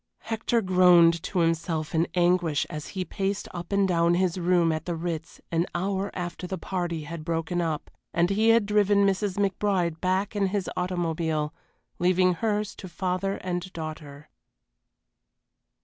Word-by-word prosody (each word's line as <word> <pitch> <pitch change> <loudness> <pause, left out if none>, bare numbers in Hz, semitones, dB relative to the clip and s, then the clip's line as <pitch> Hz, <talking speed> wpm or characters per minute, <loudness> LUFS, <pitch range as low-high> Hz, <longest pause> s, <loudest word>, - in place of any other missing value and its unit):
Hector 225 +1 0
groaned 175 -3 +5
to 180 0 -1
himself 165 -1 -1
in 165 +1 +2
anguish 175 -4 +2
as 150 -2 -6
he 185 - -1
paced 195 +3 -2
up 175 0 -7
and 200 -1 +3
down 170 -1 +3
his 185 0 +1
room 175 -1 +3
at 155 0 -3
the 175 - -2
Ritz 165 -1 -5
an 170 +1 +1
hour 195 +2 -1
after 180 0 -5
the 190 - -4
party 175 -2 -3
had 160 +1 -7
broken 165 +2 -1
up, 160 -3 -3 0.2
and 170 +2 +2
he 220 +3 +3
had 225 -2 +5
driven 205 -1 +3
Mrs. 195 0 0
McBride 190 -4 0
back 190 +3 0
in 200 -1 +2
his 195 0 -2
automobile, 165 -4 -1 0.5
leaving 180 +1 +3
hers 210 +2 -1
to 190 - -8
father 185 +2 -1
and 180 0 -3
daughter. 155 -2 -7
180 Hz, 155 wpm, -26 LUFS, 165-195 Hz, 0.5 s, groaned